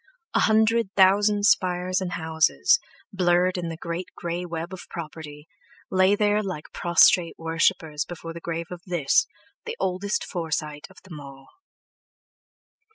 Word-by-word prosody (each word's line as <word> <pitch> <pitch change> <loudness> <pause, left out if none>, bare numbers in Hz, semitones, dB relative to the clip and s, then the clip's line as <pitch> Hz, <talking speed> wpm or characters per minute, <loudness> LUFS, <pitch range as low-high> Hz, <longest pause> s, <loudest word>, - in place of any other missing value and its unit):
A - - +3
hundred 220 0 +3
thousand 205 +2 +4
spires 185 -1 +2
and 180 0 -4
houses, 160 - +2 0.3
blurred 180 -1 +2
in 175 -2 -3
the 165 - -6
great 170 +2 -5
grey 175 +1 -4
web 170 +2 -5
of 185 - -9
property, 155 -2 -9 0.4
lay 190 +2 +4
there 210 0 +2
like 185 -7 -7
prostrate 170 0 +4
worshippers 160 -2 0
before 165 -1 -8
the 170 - -8
grave 170 0 -5
of 175 -1 -7
this, 170 -6 +2 0.4
the 465 0 -5
oldest 190 +2 -1
Forsyte 155 -4 -4
of 190 - -19
them 170 -5 -10
all. 135 -1 -13
175 Hz, 140 wpm, -24 LUFS, 165-190 Hz, 0.4 s, thousand